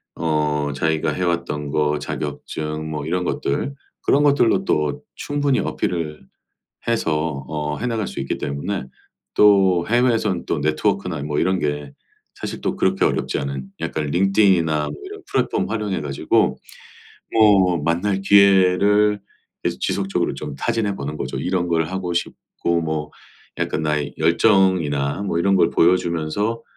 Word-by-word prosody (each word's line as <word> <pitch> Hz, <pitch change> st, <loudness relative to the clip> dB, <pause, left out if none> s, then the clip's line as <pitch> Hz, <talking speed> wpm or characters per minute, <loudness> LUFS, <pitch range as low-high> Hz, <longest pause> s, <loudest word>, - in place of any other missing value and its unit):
어 75 Hz, -2 st, 0 dB
자기가 80 Hz, +2 st, 0 dB
해왔던 85 Hz, -5 st, -2 dB
거, 75 Hz, 0 st, +1 dB
자격증 75 Hz, +1 st, -5 dB
뭐 75 Hz, -2 st, -4 dB
이런 90 Hz, +2 st, 0 dB
것들. 85 Hz, -, -2 dB, 0.3 s
그런 145 Hz, +2 st, +4 dB
것들로 140 Hz, -5 st, +3 dB
또 75 Hz, -1 st, 0 dB
충분히 145 Hz, -2 st, 0 dB
어필을 80 Hz, -4 st, -3 dB, 0.6 s
해서 80 Hz, -, -1 dB
어 75 Hz, -1 st, -3 dB
해나갈 115 Hz, -3 st, -2 dB
수 -, -, -6 dB
있기 65 Hz, -, -2 dB
때문에 70 Hz, +6 st, -3 dB, 0.5 s
또 95 Hz, -4 st, +5 dB
해외에서는 115 Hz, -6 st, +1 dB
또 80 Hz, -, 0 dB
네트워크나 85 Hz, +2 st, 0 dB
뭐 75 Hz, 0 st, -3 dB
이런 95 Hz, 0 st, +1 dB
게 75 Hz, -1 st, -3 dB, 0.4 s
사실 -, -, -6 dB
또 -, -, -1 dB
그렇게 -, -, +1 dB
어렵지 -, -, 0 dB
않은 70 Hz, -1 st, -4 dB, 0.2 s
약간 75 Hz, -, -2 dB
링크드인이나 85 Hz, -3 st, +2 dB, 0.2 s
이런 -, -, -9 dB
플랫폼 -, -, 0 dB
활용해 105 Hz, -3 st, -2 dB
가지고 70 Hz, -2 st, +1 dB, 0.8 s
뭐 95 Hz, -7 st, +4 dB
만날 90 Hz, +5 st, 0 dB
기회를 100 Hz, +1 st, +4 dB, 0.4 s
계속 -, -, -2 dB
지속적으로 95 Hz, -5 st, -1 dB
좀 70 Hz, +1 st, -6 dB
타진해 110 Hz, +2 st, -1 dB
보는 70 Hz, +2 st, -5 dB
거죠. -, -, -4 dB
이런 90 Hz, -1 st, -1 dB
걸 80 Hz, -1 st, +2 dB
하고 95 Hz, 0 st, -3 dB
싶고 85 Hz, 0 st, -2 dB
뭐 80 Hz, -2 st, -3 dB, 0.5 s
약간 80 Hz, -, -1 dB
나의 75 Hz, -1 st, -1 dB
열정이나 85 Hz, -5 st, +2 dB
뭐 95 Hz, -4 st, -1 dB
이런 95 Hz, +3 st, +2 dB
걸 -, -, +4 dB
보여주면서 90 Hz, +5 st, +1 dB
85 Hz, 295 characters per minute, -21 LUFS, 75-100 Hz, 0.8 s, 또